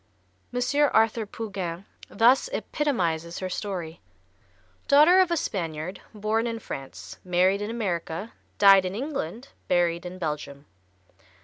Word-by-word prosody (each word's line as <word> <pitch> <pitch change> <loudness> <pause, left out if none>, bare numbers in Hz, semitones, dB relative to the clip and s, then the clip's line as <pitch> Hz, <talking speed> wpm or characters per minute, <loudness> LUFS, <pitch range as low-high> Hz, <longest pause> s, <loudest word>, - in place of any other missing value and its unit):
M. 245 - -2 0.4
Arthur 220 0 +3
Pougin 195 -5 -5 0.2
thus 250 - +4
epitomizes 175 - -1
her 185 - -4
story: 180 -6 -5 0.9
"Daughter 305 +6 +7
of 370 -2 +4
a 340 - +1
Spaniard, 170 - -4
born 215 +2 -1
in 230 -1 -3
France, 135 -11 -8
married 185 +2 +2
in 205 - -3
America, 195 -3 -3 0.2
died 195 -1 +7
in 185 +1 -3
England, 260 - -4 0.2
buried 170 -1 +1
in 180 +1 -7
Belgium. 150 -4 -5
195 Hz, 120 wpm, -26 LUFS, 170-230 Hz, 0.9 s, Daughter